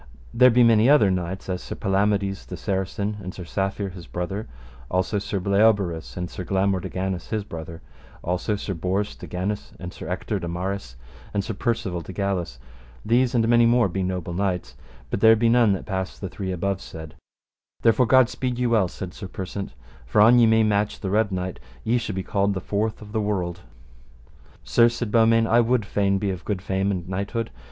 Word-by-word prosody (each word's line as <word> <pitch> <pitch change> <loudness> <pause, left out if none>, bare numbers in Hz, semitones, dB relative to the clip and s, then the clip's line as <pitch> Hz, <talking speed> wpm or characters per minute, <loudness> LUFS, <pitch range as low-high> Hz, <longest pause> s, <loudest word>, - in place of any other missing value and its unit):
There 125 +2 +7
be 125 0 +5
many 115 +1 +5
other 110 -10 +6
knights, 90 +1 -3
as 90 -1 -3
Sir - - -6
Palamides 100 0 0
the - - -6
Saracen 100 +1 -2
and 95 -1 -7
Sir 90 - -7
Safere 95 +2 -2
his 90 -3 -11
brother; 95 +5 -4 0.4
also 95 +3 0
Sir 100 0 -3
Bleoberis 100 -4 +1
and 90 0 -2
Sir 90 - -7
Blamore 95 +1 +1
de - - -6
Ganis 95 -1 -3
his 110 -2 -2
brother; 80 -3 -8 0.4
also 90 +4 -1
Sir 100 -1 -4
Bors 95 +4 -2
de - - -10
Ganis 95 +4 -4
and 90 -1 -7
Sir - - -8
Ector 95 +3 -2
de 85 - -5
Maris 90 -6 -4 0.4
and 100 - +1
Sir 110 - -4
Percivale 100 -4 -2
de 90 +4 -9
Galis; 95 -9 -2 0.5
these 125 +2 +2
and 115 -1 +3
many 120 0 +5
more 120 -2 +4
be 95 +2 -3
noble 90 -2 -3
knights, 90 -9 -2 0.4
but - - -1
there 110 +1 +7
be 115 +1 +2
none 115 -2 +5
that 95 - -4
pass 95 -2 -3
the 95 - -5
three 95 0 -4
above 95 +1 -2
said; 80 -1 -9 0.7
therefore 115 +2 +4
God 130 0 +6
speed 125 0 -3
you 125 -1 0
well, 110 -5 +3
said 90 +1 -7
Sir 95 - -7
Persant, 95 -4 -6 0.3
for 60 - +1
an 120 +3 +7
ye 115 - +6
may 110 0 +4
match 105 -1 +1
the 95 - -3
Red 105 0 +2
Knight 95 -1 -3 0.2
ye 120 +2 +2
shall 105 -4 -4
be 95 - -2
called 100 +1 0
the - - -1
fourth 105 +4 -2
of 105 - -12
the 110 0 0
world. 95 -4 -2 1.0
Sir, 120 0 +4
said 120 -2 -4
Beaumains, 115 0 +4
I 115 +1 +4
would 120 -2 +2
fain 100 -1 +1
be 100 0 -1
of 90 -1 -6
good 95 -3 -3
fame 95 +1 0
and 95 -3 -1
of - - -15
knighthood. 100 +4 -3
100 Hz, 205 wpm, -24 LUFS, 95-110 Hz, 1.0 s, There